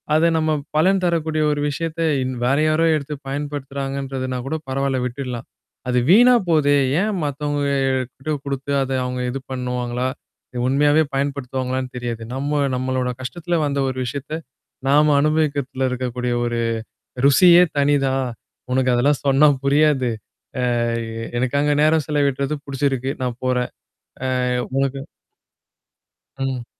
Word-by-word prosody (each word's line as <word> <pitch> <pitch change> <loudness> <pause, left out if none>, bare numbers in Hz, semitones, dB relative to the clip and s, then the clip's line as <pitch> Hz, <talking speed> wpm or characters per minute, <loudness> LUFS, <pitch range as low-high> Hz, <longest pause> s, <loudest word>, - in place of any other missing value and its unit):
அத 160 - +4
நம்ம 155 0 +1 0.2
பலன் 185 +5 +3
தரக்கூடிய 160 -2 0
ஒரு 145 - -1
விஷயத்த 165 +3 -3 0.2
இன் 130 - -3
வேற 135 +3 +2
யாரோ 155 +2 +2
எடுத்து 150 0 -4
பயன்படுத்துறாங்கன்றதுனா 135 -2 -4
கூட 155 - -2
பரவால்ல 135 0 0
விட்டுடலாம். 125 -2 -5 0.4
அது 125 0 +3
வீணா 245 +6 +7 0.2
போதே! 145 -3 +4 0.3
ஏன் 210 -1 0
மத்தவங்க 145 0 -2 0.5
கிட்ட 155 +4 -5
குடுத்து 140 0 -3
அத 135 - -5
அவுங்க 125 0 -3
இது 135 - -4
பண்ணுவாங்களா? 125 0 -2 0.6
உண்மையாவே 145 +3 +4
பயன்படுத்துவாங்களான்னு 130 -2 -2
தெரியாது. 120 -2 -4
நம்ம, 140 +3 -2 0.2
நம்மளோட 130 0 -1
கஷ்டத்துல 175 +6 -2
வந்த 140 -1 -1
ஒரு 130 - -5
விஷயத்த. 140 +4 -5 0.6
நாம 150 +2 +5
அனுபவிக்கிறதுல 145 -4 0
இருக்கக்கூடிய 125 -1 -2
ஒரு 120 0 -1 0.7
ருசியே 175 +4 +7 0.2
தனிதான். 135 -2 +2 0.5
உனக்கு 130 0 +2
அதெல்லாம் 135 +4 +2
சொன்னா 140 +2 +5 0.2
புரியாது. 140 -3 +3 0.7
அ - - +1 0.4
எ - - -4
எனக்கு 130 +3 0
அங்க 150 0 +2
நேரம் 155 0 +3
செலவிட்டுறது 140 -1 0
புடிச்சிருக்கு. 135 -1 -1
நான் 125 -1 -2
போறேன். 125 -1 0 0.8
அ - - 0 0.2
உனக்கு" 135 0 0 1.4
ம். 130 -3 -3
140 Hz, 125 wpm, -21 LUFS, 130-150 Hz, 1.4 s, வீணா